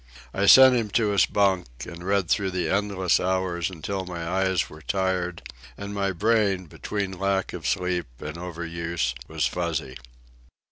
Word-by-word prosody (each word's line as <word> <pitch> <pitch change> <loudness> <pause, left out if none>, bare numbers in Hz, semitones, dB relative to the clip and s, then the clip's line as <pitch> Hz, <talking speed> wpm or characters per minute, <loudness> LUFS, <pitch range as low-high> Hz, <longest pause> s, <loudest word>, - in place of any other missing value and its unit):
I 100 +1 +1
sent 130 +2 +9
him 115 -3 0
to 110 -3 +2
his 100 -4 +3
bunk, 95 -3 +1 0.2
and 85 +1 -9
read 100 -1 +1
through 95 +3 +1
the 90 -1 -2
endless 100 -2 +1
hours 95 -2 -1
until 95 +2 -4
my 85 -2 -6
eyes 95 0 +1
were 75 - -13
tired, 90 -1 -1 0.3
and 100 0 -6
my 100 -1 0
brain, 100 -1 +1
between 95 +2 -4
lack 95 -1 0
of 85 -4 -5
sleep 90 -4 -1
and 75 +1 -6
over 85 -1 -6
use, 85 -6 -2
was - - -1
fuzzy. 80 -6 -2
95 Hz, 160 wpm, -25 LUFS, 85-100 Hz, 0.3 s, sent